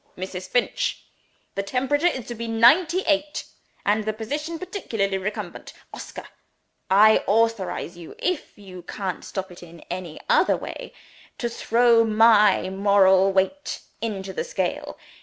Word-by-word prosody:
Mrs. 185 0 -6
Finch! 245 - -1 0.5
the 195 - -2
temperature 265 - 0
is 260 -9 -2
to 240 - -6
be 230 0 -6
ninety 315 +11 +4
eight, 300 -3 -1 0.4
and 210 +1 +2
the 215 +1 -2
position 295 +10 -4
partially 225 - -2
recumbent. 205 +3 -6 0.2
Oscar! - - -8 0.6
I 215 +3 +6
authorize 210 -5 0
you 165 - -11
(if 360 -4 -3
you 185 -3 -11
can't 185 +1 -5
stop 190 -1 -5
it 175 - -13
in 170 -1 -13
any 180 -3 -6
other 485 0 +3
way) - - -8 0.5
to 240 - -2
throw 235 0 +3
My 215 -3 +4
moral 195 -1 +4
weight 195 +10 -1 0.2
into 195 -4 -4
the - - -2
scale. - - -3
215 Hz, 140 wpm, -24 LUFS, 190-250 Hz, 0.6 s, I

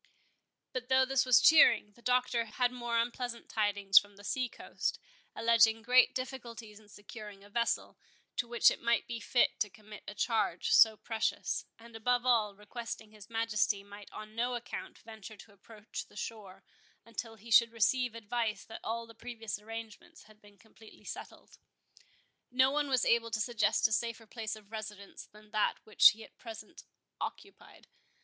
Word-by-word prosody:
But 255 -1 -4
though 260 0 +5
this 260 -1 +1
was 255 - +7
cheering, 235 -9 +6
the 235 - -22
Doctor 250 -1 +1
had 245 +3 0
more 240 -2 -2
unpleasant 235 +1 -2
tidings 205 -2 +4
from 205 0 -14
the 205 - -15
sea 255 +4 -1
coast, - - -4 0.4
alleging 230 -1 +4
great 250 +2 +5
difficulties 235 -5 -7
in 210 -1 -21
securing 205 -1 -11
a 205 - -17
vessel, 235 +2 -1 0.4
to 240 - -1
which 235 0 +5
it - - -6
might 235 0 +1
be 235 -1 -5
fit 240 +3 +1
to 210 - 0
commit 210 +1 -13
a 205 - -7
charge 220 -5 0
so 220 -1 +7
precious; 225 0 -2
and, 230 0 -15
above 245 +2 0
all, 220 -5 +2
requesting 220 +1 -8
his 210 -1 -14
Majesty 220 -3 0
might 205 0 -13
on 215 0 -9
no 245 +2 0
account 240 0 -7
venture 220 -1 -11
to 200 +1 -15
approach 210 +2 -9
the - - -21
shore, 205 -4 -7 0.4
until 230 0 -6
he 225 +2 -13
should 230 +1 +6
receive 240 +1 +1
advice 225 -2 -2
that 225 - -10
all 230 +1 -3
the 230 - -14
previous 225 -2 -6
arrangements 225 0 -9
had 215 0 -20
been 205 -1 -19
completely 220 0 -18
settled. - - -10 0.9
No 260 +2 +3
one 295 0 0
was 260 -3 +2
able 230 0 +2
to 220 -1 -2
suggest 220 -2 +2
a - - -12
safer 230 0 -1
place 220 -1 -5
of 215 -1 -16
residence 210 -2 -8
than 210 0 -19
that 215 -1 +1
which 215 - +8
he 220 +1 -7
at - - -17
present 225 -2 -10 0.3
occupied. 395 0 -8
225 Hz, 170 wpm, -32 LUFS, 210-240 Hz, 0.9 s, which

